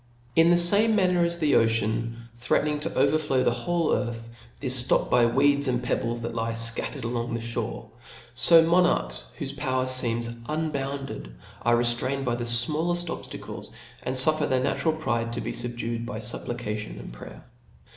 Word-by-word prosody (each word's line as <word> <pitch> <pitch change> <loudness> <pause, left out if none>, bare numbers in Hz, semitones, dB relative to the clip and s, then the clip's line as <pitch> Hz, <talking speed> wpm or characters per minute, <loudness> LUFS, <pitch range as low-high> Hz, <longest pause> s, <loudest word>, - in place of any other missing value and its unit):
In 165 +1 +5
the 175 - +5
fame 205 +6 +4
manner 180 -3 +2
as 170 0 -1
the 155 -4 +1
ocean, 115 0 +1 0.2
threatening 150 +5 0
to 155 +3 -5
overflow 145 -5 +2
the - - +2
whole 165 +8 0
earth, 115 -2 -3 0.3
is 130 -2 -1
(lopped - - +2
by 120 -1 +5
weeds 140 +3 +3
and 125 -1 0
pebbles 120 -1 -2
that 115 0 -4
lie 115 0 -2
fcattered 115 +4 -2
along 120 0 -3
the - - -2
ihore; 115 -1 -4 0.4
fo 165 +7 +6
monarchs, 165 - +1
whofe 140 0 -5
power 130 -2 -1
feems 120 -2 -1 0.2
unbounded, 140 - -4 0.3
are 120 0 +3
re 120 - +1
itrained 130 +3 0
by 120 - 0
the 120 0 -3
fmalleft 155 +9 0
obftacles, - - -7 0.3
and 130 - -3
fufSsr 155 +3 +6
their 130 -1 +2
natural 160 +3 0
pride 115 -7 -2
to 120 - -3
be - - -4
fubdued 120 -1 -4
by 120 -1 -6
fupplication 110 - -4
and - - -10
prayer. - - -12
125 Hz, 165 wpm, -26 LUFS, 115-150 Hz, 0.4 s, fo